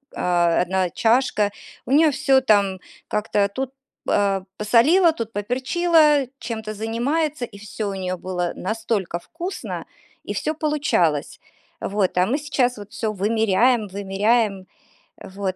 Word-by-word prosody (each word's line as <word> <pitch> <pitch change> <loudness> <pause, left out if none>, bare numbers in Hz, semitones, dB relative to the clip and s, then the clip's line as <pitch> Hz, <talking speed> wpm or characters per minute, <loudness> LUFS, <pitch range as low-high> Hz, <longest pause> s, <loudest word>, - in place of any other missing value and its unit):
э, 175 -1 +2
"1 185 0 0
чашка", 230 -2 +2 0.4
у - - -4
неё 305 +2 +5
всё 265 0 +3
там 200 -6 +2 0.3
как-то 210 -1 0
тут, 260 +5 -4 0.4
э, 195 -2 +1
посолила, 295 - +4
тут 230 -6 -6
поперчила, 290 - +2
чем-то 220 -2 -5
занимается, 250 +7 -1
и 220 -4 -14
всё 215 +1 -7
у 195 - -4
неё 185 -1 -3
было 180 -1 -3
настолько 215 -3 -2
вкусно, 350 - -6 0.4
и - - -1
всё 310 - -1
получалось. 295 - 0 0.4
Вот, 195 -2 -1
а 180 - +4
мы 265 +7 +1
сейчас 255 -4 0
вот 205 0 -10
всё 220 -3 -2
вымеряем, 220 +2 +2
вымеряем. 200 +1 0 0.7
Вот, 195 -2 -2
220 Hz, 130 wpm, -22 LUFS, 195-260 Hz, 0.7 s, неё